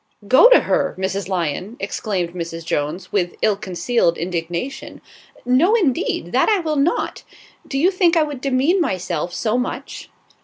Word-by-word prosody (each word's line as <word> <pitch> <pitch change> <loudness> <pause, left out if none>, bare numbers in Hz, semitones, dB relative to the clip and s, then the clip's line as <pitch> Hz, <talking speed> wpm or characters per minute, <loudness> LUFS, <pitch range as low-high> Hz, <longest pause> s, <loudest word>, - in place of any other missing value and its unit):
"Go 260 - +7
to - - +7
her, - - 0
Mrs. 190 0 -3
Lyon," 180 - -3
exclaimed 180 -6 -3
Mrs. 165 -2 -6
Jones, 150 +3 -3
with 180 -4 -1
ill 215 -2 +3
concealed 190 -1 0
indignation. 175 +8 -4 0.5
"No, 280 - +4
indeed, 345 - 0
that - - +3
I 425 - +4
will 315 -3 -2
not. 285 +5 0 0.5
Do 270 - -3
you 345 +7 +3
think 360 -3 +3
I 320 - +4
would 290 -4 -6
demean 275 +8 +2
myself 180 - -2
so 225 +6 -1
much?" 250 - -5
215 Hz, 155 wpm, -20 LUFS, 175-295 Hz, 0.5 s, Go